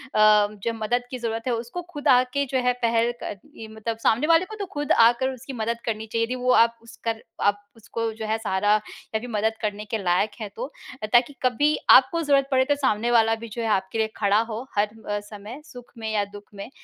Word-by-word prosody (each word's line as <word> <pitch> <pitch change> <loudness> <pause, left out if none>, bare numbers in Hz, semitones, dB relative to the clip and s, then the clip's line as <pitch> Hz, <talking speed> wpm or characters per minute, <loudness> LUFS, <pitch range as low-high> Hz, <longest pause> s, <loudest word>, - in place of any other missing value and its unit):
जब 215 +1 +3
मदद 245 +3 0
की 255 - -4
ज़रूरत 225 -1 -3
है, 245 - +1
उसको 240 +10 -4
खुद 290 0 -4
आके 255 +2 +3
जो 260 0 -1
है 250 - +4
पहल 230 +1 +2
क 205 - -5 0.2
ये 220 - -9
मतलब 220 +1 -5
सामने 230 +6 +2
वाले 330 +2 +5
को 435 - -9
तो 405 -2 -4
खुद 290 0 -2
आकर 240 +3 +5
उसकी 260 +2 -9
मदद 230 0 -2
करनी 220 -1 -2
चाहिए 230 +1 -1
थी। 255 - -3
वो 250 0 +1
आप 230 -1 +4
उसका 230 0 -4 0.3
आप 205 0 +1
उसको 225 0 -4
जो 220 0 -6
है 220 +1 0
सहारा 205 -1 +1
या 215 +1 -5
फिर 245 +2 -8
मदद 220 0 0
करने 210 -1 -3
के 225 - -2
लायक 180 +4 +2
हैं 210 - -4
तो 255 +5 -5 0.4
ताकि 240 +4 +4
कभी 290 +5 +2
आपको 270 +6 +7
ज़रूरत 275 -2 +3
पड़े 260 0 +4
तो 290 - +2
सामने 240 -4 0
वाला 225 -1 +4
भी - - -5
जो 235 - -4
है 225 - -1
आपके 190 0 0
लिए 220 0 +2
खड़ा 205 0 +3
हो, 230 +2 -5
हर 205 0 +3 0.3
समय 210 +6 -10
सुख 245 -1 -13
में 220 -1 -4
या 205 -1 +2
दुःख 205 0 -12
में। 200 +3 -7
230 Hz, 225 wpm, -24 LUFS, 215-250 Hz, 0.4 s, आपको